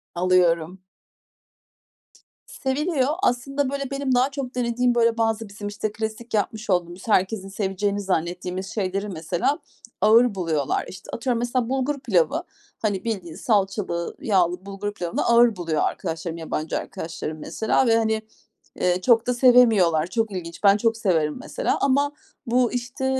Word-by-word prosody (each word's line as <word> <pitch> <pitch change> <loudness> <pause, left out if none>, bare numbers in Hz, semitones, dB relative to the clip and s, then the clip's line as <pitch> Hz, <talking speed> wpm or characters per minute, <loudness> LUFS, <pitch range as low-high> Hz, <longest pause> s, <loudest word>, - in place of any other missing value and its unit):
Alıyorum. 180 0 +2 1.7
Seviliyor. 275 +1 -1 0.2
Aslında, 275 +1 0
böyle, 275 0 -4
benim 275 -2 0
daha 255 +2 +3
çok 270 -2 -5
denediğim, 245 0 +1
böyle, 230 -1 +3
bazı 225 -1 0
bizim, 205 +1 -7
işte, 205 +1 -3
klasik 220 +2 -5
yapmış 215 +1 -1
olduğumuz, 175 +1 -1
herkesin 195 -1 +1
seveceğini 200 0 -1
zannettiğimiz 180 0 -2
şeyleri 200 0 -2
mesela 170 - -1 0.4
ağır 230 0 +5
buluyorlar. 160 -7 -1
İşte, 185 - -11
atıyorum 240 0 -1
mesela 240 0 -1
bulgur 270 +2 -1
pilavı, 245 - +1 0.4
hani, 205 -4 -1
bildiğin 190 -8 -4
salçalı, 195 -5 -1
yağlı 180 -3 +1
bulgur 200 +1 -5
pilavını 175 -4 -2
ağır 235 -1 +5
buluyor 165 -4 -1
arkadaşlarım, 165 +1 -3
yabancı 160 -1 -3
arkadaşlarım 160 -1 -6
mesela 220 +9 0
ve 225 - +5
hani, 220 -1 +1 0.5
eee, 180 0 +1
çok 230 +3 +4
da 250 - +2
sevemiyorlar. 225 -11 +5
Çok 225 +2 -1
ilginç. 170 -1 -7
Ben 200 0 +6
çok 225 +1 +1
severim 165 -7 +1
mesela - - -1
ama 280 +1 +2 0.3
bu, 245 0 +2
işte, 245 +1 -4
215 Hz, 140 wpm, -24 LUFS, 180-245 Hz, 1.7 s, Ben